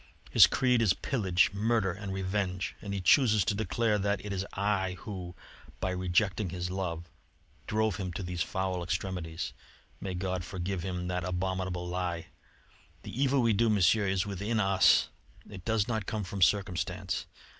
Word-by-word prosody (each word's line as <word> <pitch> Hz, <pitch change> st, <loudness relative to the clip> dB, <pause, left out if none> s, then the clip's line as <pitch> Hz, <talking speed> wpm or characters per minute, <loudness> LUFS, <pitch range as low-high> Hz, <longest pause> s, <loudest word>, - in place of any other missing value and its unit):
His -, -, +9 dB
creed 125 Hz, -2 st, +2 dB
is 100 Hz, -5 st, +3 dB
pillage, 95 Hz, -9 st, +1 dB
murder, 105 Hz, -1 st, +1 dB
and 100 Hz, +2 st, -6 dB
revenge; 95 Hz, -1 st, -2 dB
and 100 Hz, -, -6 dB
he 100 Hz, -1 st, -2 dB
chooses 110 Hz, -1 st, +5 dB
to -, -, +1 dB
declare 110 Hz, 0 st, 0 dB
that 100 Hz, +1 st, -1 dB
it 100 Hz, -, -3 dB
is 95 Hz, -1 st, -1 dB
I 95 Hz, -2 st, 0 dB
who, 90 Hz, -4 st, -7 dB, 0.4 s
by 95 Hz, -, -1 dB
rejecting 90 Hz, +2 st, +1 dB
his 90 Hz, 0 st, -4 dB
love, 85 Hz, -3 st, -3 dB, 0.6 s
drove 110 Hz, -3 st, +1 dB
him 90 Hz, -2 st, -3 dB
to 95 Hz, -, -4 dB
these 90 Hz, -1 st, -3 dB
foul 95 Hz, 0 st, -1 dB
extremities. 85 Hz, -1 st, -3 dB, 0.5 s
May 95 Hz, -2 st, -4 dB
God 90 Hz, 0 st, -2 dB
forgive 90 Hz, +2 st, -3 dB
him 90 Hz, 0 st, -3 dB
that 90 Hz, -1 st, -1 dB
abominable 90 Hz, 0 st, -2 dB
lie! 90 Hz, -2 st, -2 dB, 0.8 s
The -, -, -7 dB
evil 135 Hz, 0 st, +2 dB
we 115 Hz, -1 st, +4 dB
do, 115 Hz, +3 st, +3 dB
Monsieur, 105 Hz, 0 st, +3 dB
is 95 Hz, +2 st, +1 dB
within 100 Hz, +3 st, -2 dB
us; 95 Hz, -1 st, +4 dB, 0.4 s
it 95 Hz, -4 st, -10 dB
does 110 Hz, -2 st, +1 dB
not 110 Hz, -4 st, -2 dB
come 110 Hz, -1 st, -2 dB
from 100 Hz, +1 st, -5 dB
circumstance. 95 Hz, -1 st, +1 dB
95 Hz, 165 wpm, -30 LUFS, 90-105 Hz, 0.8 s, His